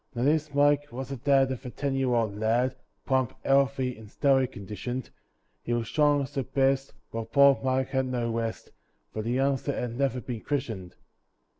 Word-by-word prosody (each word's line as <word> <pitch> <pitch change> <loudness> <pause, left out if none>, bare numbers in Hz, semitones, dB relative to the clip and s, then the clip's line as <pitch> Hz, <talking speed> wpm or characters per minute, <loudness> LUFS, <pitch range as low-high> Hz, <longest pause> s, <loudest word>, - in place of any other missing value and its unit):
Now 120 - -1
this 150 +1 +2
Mike 145 0 +3
was 130 +2 -6
the 135 - -4
dad 135 +1 +3
of 130 - -5
a 125 - -5
ten 140 +2 -2
year 130 -2 +1
old 110 -3 0
lad, 120 +4 +1 0.3
Plump, 130 -3 +1
healthy, 135 -2 +2
and 110 -1 -13
stoutly 135 +1 +3
conditioned; 110 +3 -6 0.5
He 120 - -2
was 120 -1 -1
strong 145 -1 +3
as 130 - -8
the 135 - 0
best, 135 +1 +1 0.2
but 115 -1 -5
poor 140 -1 +6
Mike 130 0 +1
had 130 -1 0
no 120 -2 -1
rest 115 -1 -3 0.4
For 110 - -3
the 115 +3 -2
youngster 135 +1 0
had 120 -1 -3
never 135 -2 +1
been 120 -2 -6
christened. 110 -11 -3
130 Hz, 185 wpm, -28 LUFS, 120-140 Hz, 0.5 s, poor